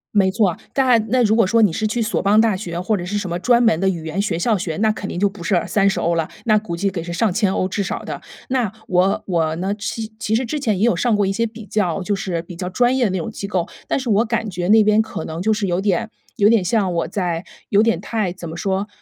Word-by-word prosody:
没 190 Hz, -2 st, +4 dB
错。 195 Hz, -5 st, +2 dB, 0.2 s
但 250 Hz, -5 st, +3 dB
那 255 Hz, +1 st, +3 dB
如 220 Hz, 0 st, +3 dB
果 230 Hz, -4 st, +4 dB
说 230 Hz, +4 st, +3 dB
你 195 Hz, -7 st, +4 dB
是 215 Hz, -, -1 dB
去 225 Hz, +3 st, -1 dB
索 225 Hz, +1 st, 0 dB
邦 205 Hz, +2 st, +4 dB
大 220 Hz, -3 st, +3 dB
学 175 Hz, -3 st, -5 dB
或 210 Hz, +4 st, 0 dB
者 175 Hz, -, -4 dB
是 205 Hz, +3 st, -2 dB
什 195 Hz, -4 st, -3 dB
么 170 Hz, -, -2 dB
专 240 Hz, +6 st, +3 dB
门 225 Hz, -8 st, +4 dB
的 195 Hz, -, +3 dB
语 170 Hz, -4 st, -4 dB
言 170 Hz, +5 st, -1 dB
学 180 Hz, -5 st, -1 dB
校 215 Hz, +3 st, +2 dB
学， 165 Hz, -3 st, -4 dB
那 220 Hz, +1 st, +2 dB
肯 200 Hz, -2 st, -6 dB
定 175 Hz, -, -4 dB
就 205 Hz, -, +4 dB
不 195 Hz, -3 st, -8 dB
是 175 Hz, -1 st, +2 dB
30 195 Hz, -2 st, +2 dB
欧 170 Hz, 0 st, +1 dB
了， 165 Hz, -1 st, -1 dB, 0.2 s
那 215 Hz, -2 st, +4 dB
估 180 Hz, -5 st, -4 dB
计 195 Hz, +3 st, 0 dB
得是 175 Hz, -2 st, -5 dB
上 210 Hz, +3 st, +1 dB
千 200 Hz, -2 st, +1 dB
欧 185 Hz, -, 0 dB
至 200 Hz, +1 st, -2 dB
少 -, -, -3 dB
的。 -, -, -6 dB, 0.3 s
那 250 Hz, -6 st, 0 dB, 0.2 s
我 185 Hz, +2 st, +2 dB
我 160 Hz, -4 st, 0 dB
呢 190 Hz, +3 st, -2 dB
其 220 Hz, +1 st, -5 dB
其 220 Hz, -1 st, -2 dB
实 245 Hz, +3 st, +1 dB
之 300 Hz, +6 st, -3 dB
前 220 Hz, -9 st, 0 dB
也 220 Hz, -, +3 dB
有 235 Hz, -, +3 dB
上 240 Hz, -2 st, +1 dB
过 205 Hz, -, +2 dB
一 195 Hz, -, 0 dB
些 230 Hz, +3 st, 0 dB
比 225 Hz, -1 st, -8 dB
较 195 Hz, -3 st, -1 dB
就 205 Hz, +2 st, -1 dB
是 185 Hz, -4 st, -3 dB
比 175 Hz, 0 st, -10 dB
较 180 Hz, +1 st, -4 dB
专 245 Hz, +6 st, +2 dB
业 260 Hz, -, +2 dB
的 210 Hz, -, +2 dB
那 190 Hz, -, -1 dB
种 165 Hz, -, -3 dB
机 200 Hz, -, -6 dB
构， 185 Hz, -4 st, -1 dB, 0.2 s
但 -, -, +1 dB
是 255 Hz, -3 st, -4 dB
我 215 Hz, +2 st, +4 dB
感 225 Hz, -1 st, -1 dB
觉 180 Hz, 0 st, -3 dB
那 220 Hz, 0 st, +7 dB
边 215 Hz, +1 st, +4 dB
可 220 Hz, -7 st, -5 dB
能 160 Hz, +2 st, -5 dB
就 220 Hz, -, +1 dB
是 210 Hz, -2 st, 0 dB
有 175 Hz, +1 st, 0 dB
点 210 Hz, +3 st, 0 dB, 0.3 s
有 205 Hz, -1 st, +5 dB
点 225 Hz, -3 st, +4 dB
像 190 Hz, -1 st, +1 dB
我 170 Hz, -1 st, -1 dB
在 175 Hz, -3 st, -2 dB, 0.2 s
有 205 Hz, +2 st, +4 dB
点 225 Hz, -7 st, +2 dB
太 205 Hz, -2 st, -2 dB
怎 175 Hz, -2 st, -8 dB
么 165 Hz, -, -7 dB
说， 195 Hz, +3 st, -1 dB
200 Hz, 310 characters per minute, -20 LUFS, 180-220 Hz, 0.3 s, 那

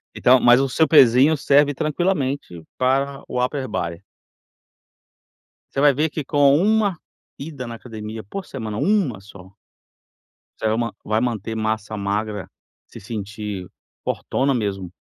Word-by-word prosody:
Então, 125 Hz, +1 st, +5 dB
mas 120 Hz, +2 st, +6 dB
o 135 Hz, -, 0 dB
seu 160 Hz, +4 st, +2 dB
pesinho 135 Hz, +1 st, +6 dB
serve 145 Hz, +1 st, +3 dB
tranquilamente 145 Hz, -, -2 dB
para 135 Hz, +2 st, 0 dB
o 125 Hz, 0 st, -1 dB
Upper 130 Hz, +1 st, -2 dB
Body. 85 Hz, -4 st, -4 dB, 1.7 s
Você 135 Hz, -, 0 dB
vai 145 Hz, 0 st, +6 dB
ver 150 Hz, +3 st, 0 dB
que 155 Hz, -, -4 dB
com 140 Hz, 0 st, +4 dB
uma 205 Hz, 0 st, +2 dB, 0.4 s
ida 140 Hz, -3 st, -6 dB
na 120 Hz, -, -7 dB
academia 110 Hz, -1 st, -8 dB
por 190 Hz, -, -7 dB
semana, 110 Hz, -5 st, -6 dB
uma 185 Hz, -, +1 dB
só 95 Hz, -1 st, -15 dB, 1.0 s
você 110 Hz, -, -1 dB
va 115 Hz, +1 st, 0 dB
vai 110 Hz, +1 st, 0 dB
manter 115 Hz, -3 st, -2 dB
massa 110 Hz, -1 st, -2 dB
magra, 100 Hz, 0 st, -3 dB, 0.4 s
se -, -, -12 dB
sentir 105 Hz, -2 st, -6 dB, 0.4 s
fortona 135 Hz, +1 st, -1 dB
mesmo, 95 Hz, -6 st, -3 dB
125 Hz, 135 wpm, -22 LUFS, 105-140 Hz, 1.7 s, mas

